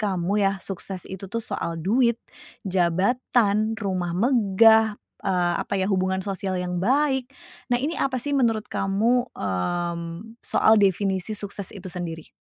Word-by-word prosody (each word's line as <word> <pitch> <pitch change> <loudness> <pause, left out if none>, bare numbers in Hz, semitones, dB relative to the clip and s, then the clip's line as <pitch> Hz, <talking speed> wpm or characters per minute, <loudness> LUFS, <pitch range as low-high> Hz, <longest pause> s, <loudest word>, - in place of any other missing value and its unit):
kamu 200 0 0
yah, 195 - -2
sukses 190 -1 -6
itu 190 0 -8
tuh 230 +3 -3
soal 170 0 -3
duit? 230 +8 +2 0.5
Jabatan? 200 +4 +1
Rumah 185 -5 -2
megah? 220 -1 +4 0.2
Eee, 180 -3 0
apa - - -3
ya? 190 +1 0
Hubungan 190 0 0
sosial 195 -1 -2
yang 180 0 -2
baik. 265 +5 +2 0.5
Nah, - - +2
ini 315 +5 -2
apa 260 -3 0
sih 290 - -3
menurut 225 -5 +1
kamu, 225 +6 +1
mmm, 170 - -3
soal 220 0 +4
definisi 195 +1 +1
sukses 200 -1 -6
itu 185 -1 -7
sendiri? 170 -3 -6
195 Hz, 140 wpm, -24 LUFS, 180-225 Hz, 0.5 s, megah